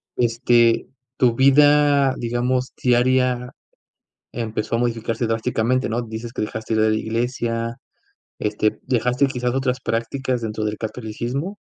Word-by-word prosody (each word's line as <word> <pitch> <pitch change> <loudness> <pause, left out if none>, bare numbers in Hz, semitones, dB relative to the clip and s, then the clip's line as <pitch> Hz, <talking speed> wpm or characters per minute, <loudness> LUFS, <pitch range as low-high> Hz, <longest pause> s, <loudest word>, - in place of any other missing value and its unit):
Este, 120 -1 +3 0.3
tu 120 -3 +3
vida, 145 +1 +5
digamos, 125 +2 -1
diaria 125 0 +2 0.8
empezó 110 -1 -3
a - - -1
modificarse 115 -1 -1
drásticamente, 115 +2 0
¿no? 120 +2 -1
Dices 115 +1 -7
que - - -2
dejaste 110 +1 -3
de 110 - +3
ir 110 - +4
a - - +2
la 110 - +2
iglesia, 115 0 -2 0.6
este, 105 0 0
¿dejaste 125 +2 +1
quizás 125 -2 -2
otras 130 -1 -1
prácticas 125 +2 -2
dentro 110 -1 -3
del 105 0 -2
catolicismo? 120 - -4
120 Hz, 135 wpm, -22 LUFS, 115-130 Hz, 0.8 s, vida